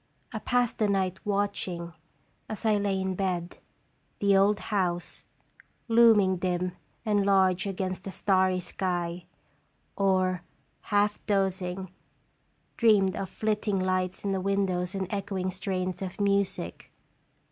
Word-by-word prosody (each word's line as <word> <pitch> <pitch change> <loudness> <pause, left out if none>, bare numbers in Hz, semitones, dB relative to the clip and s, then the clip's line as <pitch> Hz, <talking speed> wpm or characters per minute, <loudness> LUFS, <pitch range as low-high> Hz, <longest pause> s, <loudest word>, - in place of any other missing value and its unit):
I - - -3
passed 245 -2 0
the 215 - +3
night 190 -2 0
watching, 195 -4 -2 0.6
as 215 +1 -5
I 215 -1 +4
lay 200 -1 0
in 190 0 -1
bed, 180 -2 -2 0.6
the 200 -1 +3
old 200 +2 +4 0.2
house 175 -3 -1 0.6
looming 225 -5 +5
dim 180 0 -1 0.3
and 205 -2 +2
large 190 -1 +3
against 185 -1 -3
the - - -4
starry 185 -1 +2
sky, 175 -1 -3 0.7
or, 185 -2 +2 0.5
half 205 0 +2
dozing, 190 -2 -1 0.9
dreamed 205 -4 +4
of 190 - -4
flitting 210 -1 -1
lights 185 0 -1
in 200 - +1
the 190 -1 -1
windows 190 -1 0
and 190 -1 -1
echoing 195 -2 -2
strains 185 -1 -3
of 185 0 -5
music. 200 - -1
190 Hz, 125 wpm, -28 LUFS, 185-200 Hz, 0.9 s, looming